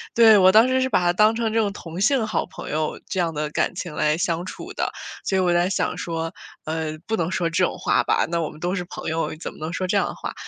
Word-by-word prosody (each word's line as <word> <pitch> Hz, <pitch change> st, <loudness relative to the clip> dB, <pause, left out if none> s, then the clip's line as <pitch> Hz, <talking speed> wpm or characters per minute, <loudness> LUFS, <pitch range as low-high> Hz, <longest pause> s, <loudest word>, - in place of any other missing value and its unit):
对， 225 Hz, -2 st, +8 dB
我 185 Hz, 0 st, +7 dB
当 220 Hz, +4 st, +6 dB
时 260 Hz, 0 st, +2 dB
是 260 Hz, -, +1 dB
把 -, -, +3 dB
他 175 Hz, 0 st, +2 dB
当 215 Hz, +4 st, +4 dB
成 225 Hz, -1 st, -1 dB
这 225 Hz, -, +2 dB
种 205 Hz, -2 st, +1 dB
同 170 Hz, -2 st, -7 dB
性 245 Hz, +2 st, +3 dB
好 215 Hz, -, -1 dB
朋 185 Hz, -, -8 dB
友， 155 Hz, 0 st, -2 dB
这 190 Hz, -, -3 dB
样 170 Hz, -2 st, +1 dB
的 150 Hz, 0 st, -2 dB
感 180 Hz, -, 0 dB
情 175 Hz, -3 st, -5 dB
来 155 Hz, 0 st, +1 dB
相 170 Hz, 0 st, -1 dB
处 -, -, -8 dB
的。 -, -, -2 dB, 0.3 s
所 190 Hz, -, 0 dB
以 -, -, +3 dB
我 175 Hz, -1 st, +2 dB
在 175 Hz, +1 st, +2 dB
想 195 Hz, -, -1 dB
说， 165 Hz, -1 st, -3 dB, 0.3 s
呃， 155 Hz, 0 st, -3 dB
不 220 Hz, -, -1 dB
能 170 Hz, -3 st, -1 dB
说 180 Hz, -2 st, 0 dB
这 165 Hz, +3 st, +1 dB
种 -, -, 0 dB
话 -, -, +2 dB
吧， -, -, +2 dB
那 170 Hz, -, +1 dB
我 160 Hz, -, -2 dB
们 155 Hz, -, -13 dB
都 175 Hz, +2 st, -1 dB
是 185 Hz, -2 st, -2 dB
朋 -, -, -8 dB
友， 160 Hz, -1 st, -2 dB
怎 -, -, -6 dB
么 -, -, -16 dB
能 155 Hz, +2 st, -4 dB
说 185 Hz, -, -2 dB
这 185 Hz, -, -1 dB
样 -, -, +2 dB
的 -, -, -6 dB
话？ -, -, -6 dB
180 Hz, 310 characters per minute, -23 LUFS, 165-210 Hz, 0.3 s, 对